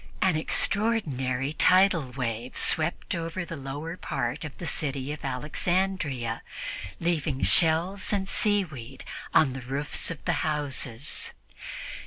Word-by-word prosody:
An 185 Hz, -3 st, +3 dB
extraordinary 150 Hz, -, +1 dB
tidal 180 Hz, -6 st, +4 dB
wave 120 Hz, -1 st, -3 dB
swept 160 Hz, +1 st, +1 dB
over 170 Hz, +1 st, -3 dB
the 165 Hz, -, -6 dB
lower 145 Hz, +4 st, -5 dB
part 125 Hz, 0 st, -2 dB
of 150 Hz, -3 st, -7 dB
the 175 Hz, -, -6 dB
city 140 Hz, -2 st, -1 dB
of 150 Hz, -, -9 dB
Alexandria, 150 Hz, -, -1 dB, 0.6 s
leaving 155 Hz, -5 st, 0 dB
shells 175 Hz, +4 st, +3 dB
and 195 Hz, -2 st, 0 dB
seaweed 155 Hz, -, 0 dB, 0.3 s
on 140 Hz, -5 st, +4 dB
the 135 Hz, -, -6 dB
roofs 135 Hz, +4 st, -1 dB
of 165 Hz, -4 st, -7 dB
the -, -, +2 dB
houses. 145 Hz, -4 st, +1 dB
150 Hz, 120 wpm, -27 LUFS, 135-175 Hz, 0.6 s, tidal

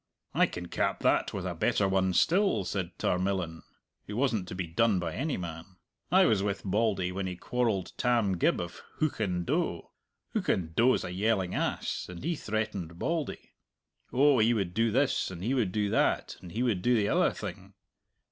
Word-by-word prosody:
"I -, -, +4 dB
can 90 Hz, 0 st, -7 dB
cap -, -, -1 dB
that -, -, +2 dB
with -, -, -4 dB
a -, -, -2 dB
better 100 Hz, -, +1 dB
one 95 Hz, -1 st, +1 dB
still," 180 Hz, -, +3 dB
said 90 Hz, -1 st, -3 dB
Tarmillan, 90 Hz, -3 st, -1 dB, 0.5 s
who 105 Hz, -, -5 dB
wasn't 115 Hz, -8 st, +1 dB
to -, -, -6 dB
be 90 Hz, -1 st, -2 dB
done 100 Hz, +5 st, +2 dB
by 85 Hz, -3 st, -2 dB
any 150 Hz, +2 st, -2 dB
man. 85 Hz, +1 st, -7 dB, 0.4 s
"I 190 Hz, +1 st, +6 dB
was 105 Hz, -, +3 dB
with 100 Hz, 0 st, -2 dB
Bauldy 100 Hz, -2 st, +1 dB
when 95 Hz, +1 st, -3 dB
he 90 Hz, -, -4 dB
quarrelled 110 Hz, -1 st, -1 dB
Tam 115 Hz, -7 st, +1 dB
Gibb -, -, +3 dB
of 85 Hz, 0 st, -6 dB, 0.2 s
Hoochan 100 Hz, -, 0 dB
doe. -, -, -1 dB, 0.4 s
Hoochan 80 Hz, -3 st, 0 dB
doe's 120 Hz, +8 st, +3 dB
a 90 Hz, -, -5 dB
yelling 95 Hz, -1 st, 0 dB
ass, -, -, -2 dB
and 90 Hz, +3 st, -8 dB
he 170 Hz, +3 st, 0 dB
threatened 105 Hz, -, -3 dB
Bauldy 165 Hz, -, -3 dB, 0.6 s
oh, 140 Hz, 0 st, +4 dB
he 115 Hz, +2 st, +4 dB
would 95 Hz, -5 st, -1 dB
do 115 Hz, +3 st, +2 dB
this, 135 Hz, +5 st, +1 dB
and 90 Hz, -1 st, -7 dB
he 120 Hz, +6 st, 0 dB
would 115 Hz, -8 st, +1 dB
do 105 Hz, +1 st, 0 dB
that, -, -, +1 dB
and 90 Hz, -, -10 dB
he 120 Hz, +4 st, 0 dB
would 110 Hz, -8 st, +1 dB
do 125 Hz, +5 st, +3 dB
the 105 Hz, -3 st, +2 dB
other -, -, +3 dB
thing. -, -, -8 dB
100 Hz, 185 wpm, -29 LUFS, 90-120 Hz, 0.6 s, I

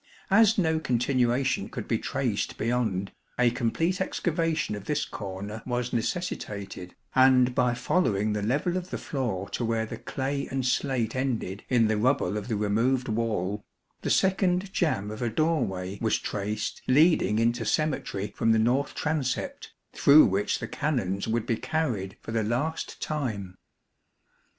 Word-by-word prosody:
As 220 Hz, +2 st, +5 dB
no 160 Hz, -4 st, +2 dB
continuation 125 Hz, -1 st, +1 dB
could -, -, -6 dB
be -, -, +1 dB
traced -, -, -2 dB
beyond, 110 Hz, -5 st, -1 dB, 0.3 s
a 125 Hz, -1 st, +4 dB
complete 165 Hz, +10 st, 0 dB
excavation 165 Hz, -, -1 dB
of 105 Hz, -1 st, -6 dB
this 150 Hz, -1 st, 0 dB
corner 100 Hz, +2 st, -6 dB
was 125 Hz, 0 st, -2 dB
necessitated, 100 Hz, -, -3 dB, 0.2 s
and 130 Hz, -1 st, +5 dB
by 125 Hz, -1 st, +2 dB
following 110 Hz, -, +1 dB
the 105 Hz, -, -1 dB
level 145 Hz, -, 0 dB
of 185 Hz, 0 st, -5 dB
the -, -, -3 dB
floor 110 Hz, -9 st, -3 dB
to -, -, -3 dB
where 115 Hz, -1 st, 0 dB
the -, -, -7 dB
clay 140 Hz, +1 st, -3 dB
and 130 Hz, -1 st, -2 dB
slate 125 Hz, -3 st, 0 dB
ended 120 Hz, -7 st, -2 dB
in 120 Hz, -3 st, +4 dB
the 110 Hz, -1 st, +1 dB
rubble 110 Hz, -4 st, +1 dB
of 105 Hz, -1 st, -4 dB
the 115 Hz, -, -1 dB
removed 115 Hz, +5 st, +1 dB
wall, 105 Hz, -3 st, -1 dB, 0.4 s
the -, -, -2 dB
second 190 Hz, 0 st, +2 dB
jamb 105 Hz, -, 0 dB
of 110 Hz, -, -7 dB
a 120 Hz, -, 0 dB
doorway 100 Hz, -, -1 dB
was 110 Hz, -, +2 dB
traced 105 Hz, +1 st, -3 dB
leading 140 Hz, -, +4 dB
into 115 Hz, +1 st, +1 dB
cemetery 130 Hz, -7 st, -1 dB
from 115 Hz, -, +3 dB
the -, -, +3 dB
north 125 Hz, +6 st, +1 dB
transept, 150 Hz, -4 st, -2 dB, 0.2 s
through 150 Hz, +2 st, +7 dB
which 100 Hz, +2 st, +1 dB
the 110 Hz, -, -5 dB
Canons 110 Hz, -9 st, -1 dB
would 115 Hz, 0 st, 0 dB
be 115 Hz, -, 0 dB
carried 120 Hz, -, -2 dB
for -, -, -7 dB
the 115 Hz, 0 st, +1 dB
last 125 Hz, +9 st, -2 dB
time. 110 Hz, -12 st, -3 dB
120 Hz, 155 wpm, -27 LUFS, 105-145 Hz, 0.4 s, through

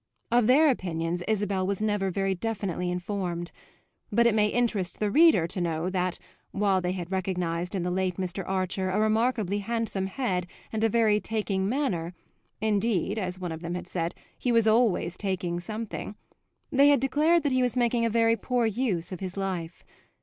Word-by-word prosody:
Of 240 Hz, -2 st, +4 dB
their 290 Hz, +4 st, +6 dB
opinions 175 Hz, -5 st, -2 dB
Isabel 200 Hz, -3 st, 0 dB
was 200 Hz, -1 st, -1 dB
never 205 Hz, -2 st, 0 dB
very 195 Hz, +1 st, 0 dB
definitely 190 Hz, -3 st, -3 dB
informed; 180 Hz, -1 st, -3 dB, 0.6 s
but 235 Hz, +3 st, +3 dB
it 235 Hz, -, +4 dB
may 210 Hz, -1 st, +3 dB
interest 210 Hz, -5 st, 0 dB
the 210 Hz, -1 st, 0 dB
reader 310 Hz, -, +6 dB
to 180 Hz, +2 st, -3 dB
know 170 Hz, +1 st, -1 dB
that, 185 Hz, -1 st, 0 dB, 0.3 s
while 195 Hz, -2 st, +1 dB
they 180 Hz, 0 st, -1 dB
had 180 Hz, -1 st, -6 dB
recognised 180 Hz, -1 st, -2 dB
in 185 Hz, -, -1 dB
the 180 Hz, -, -1 dB
late 185 Hz, 0 st, -1 dB
Mr. 185 Hz, 0 st, -3 dB
Archer 185 Hz, 0 st, -1 dB
a 190 Hz, +3 st, 0 dB
remarkably 215 Hz, -2 st, +1 dB
handsome 220 Hz, -3 st, -2 dB
head 190 Hz, -5 st, -2 dB, 0.3 s
and 220 Hz, 0 st, -1 dB
a 225 Hz, -, +4 dB
very 220 Hz, -2 st, +3 dB
taking 205 Hz, -3 st, -1 dB
manner 185 Hz, -, -1 dB, 0.4 s
(indeed, 215 Hz, -1 st, 0 dB
as 180 Hz, -2 st, -3 dB
one 180 Hz, -2 st, -4 dB
of 160 Hz, 0 st, -6 dB
them 170 Hz, 0 st, -4 dB
had 180 Hz, -, -5 dB
said, 170 Hz, -2 st, -3 dB, 0.2 s
he 245 Hz, -, -1 dB
was 230 Hz, -2 st, +4 dB
always 220 Hz, -6 st, +2 dB
taking 185 Hz, -3 st, -2 dB
something), 215 Hz, +2 st, -5 dB, 0.6 s
they 280 Hz, 0 st, +5 dB
had 285 Hz, -2 st, +5 dB
declared 300 Hz, +5 st, +3 dB
that 285 Hz, -, +1 dB
he 255 Hz, 0 st, +2 dB
was 250 Hz, -1 st, +1 dB
making 240 Hz, -1 st, +2 dB
a 230 Hz, -, +2 dB
very 230 Hz, 0 st, +3 dB
poor 240 Hz, +2 st, 0 dB
use 220 Hz, -7 st, -1 dB
of 185 Hz, -, -5 dB
his 185 Hz, 0 st, -5 dB
life. 185 Hz, -4 st, -4 dB
195 Hz, 185 wpm, -27 LUFS, 180-230 Hz, 0.6 s, their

